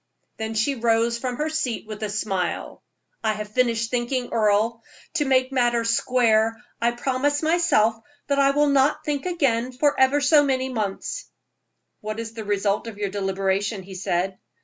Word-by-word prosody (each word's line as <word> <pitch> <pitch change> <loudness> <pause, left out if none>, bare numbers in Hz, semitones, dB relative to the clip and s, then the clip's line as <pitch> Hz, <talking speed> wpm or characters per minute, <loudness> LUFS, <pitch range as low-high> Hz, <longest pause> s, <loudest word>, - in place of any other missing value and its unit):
Then 220 0 -4
she 225 +6 +1
arose 230 0 +2
from 250 0 -3
her 300 +4 -1
seat 290 -9 -2
with 215 0 -8
a 215 - -2
smile. 195 -4 -3 0.4
"I 220 -1 +2
have 210 0 -6
finished 230 -2 +1
thinking, 245 0 -1
Earle. 220 +1 +2 0.4
To 295 - +1
make 260 -1 +2
matters 240 -3 +2
square, 225 -2 +2 0.2
I 235 - +3
promise 265 +4 -1
myself 315 -10 +3 0.3
that 280 -1 0
I 275 0 +5
will 290 +1 +3
not 280 +1 +2
think 295 +2 -2
again 260 -9 0
for 285 +3 +1
ever 265 +2 +4
so 290 +1 +5
many 265 -2 0
months." 220 - -3 0.7
"What 215 +1 -5
is 225 0 -5
the 225 -1 -6
result 205 +1 0
of 220 -3 -8
your 205 -1 -2
deliberation?" 195 +1 -1
he 190 +1 -11
said. 185 0 -2
235 Hz, 170 wpm, -24 LUFS, 215-265 Hz, 0.7 s, I